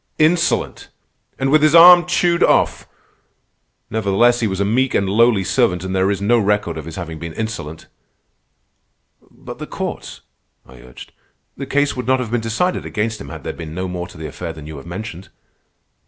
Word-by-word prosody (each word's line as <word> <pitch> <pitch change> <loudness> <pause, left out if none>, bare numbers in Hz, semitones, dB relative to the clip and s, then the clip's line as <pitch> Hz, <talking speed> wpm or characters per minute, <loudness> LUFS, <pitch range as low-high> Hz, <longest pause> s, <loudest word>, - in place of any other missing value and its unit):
Insolent! 170 +2 +1 0.5
And 135 0 -1
with 155 0 +5
his 155 +1 +4
arm 175 +1 +9
chewed 175 -1 +1
off! - - +2 1.0
Nevertheless 110 +3 +2
he 115 - 0
was 95 -1 -3
a 100 - +1
meek 125 +5 +1
and 100 - +1
lowly 110 0 +3
servant, 95 -4 +1
and 95 0 -4
there 95 +1 +2
is 100 - -1
no 115 +4 +2
record 105 -5 0
of 80 -2 -7
his 80 0 -8
having 80 -3 -7
been 85 0 -7
insolent." 80 -8 -6 1.4
"But - - -11
the - - -7
courts," - - -6 0.4
I 60 0 -16
urged. 60 0 -13 0.4
"The 140 - -7
case 145 +1 0
would 125 -2 -5
not 130 0 +2
have 120 -3 -4
been 120 -1 0
decided 115 +12 -1
against 110 +1 -3
him 70 - -9
had 80 0 -9
there - - -4
been 80 -1 -9
no 95 +1 -3
more 90 -1 -5
to 90 - -15
the 80 - -7
affair 80 +3 -6
than 80 -2 -11
you 75 -1 -9
have 70 - -11
mentioned." 90 0 -8
100 Hz, 190 wpm, -19 LUFS, 85-125 Hz, 1.4 s, arm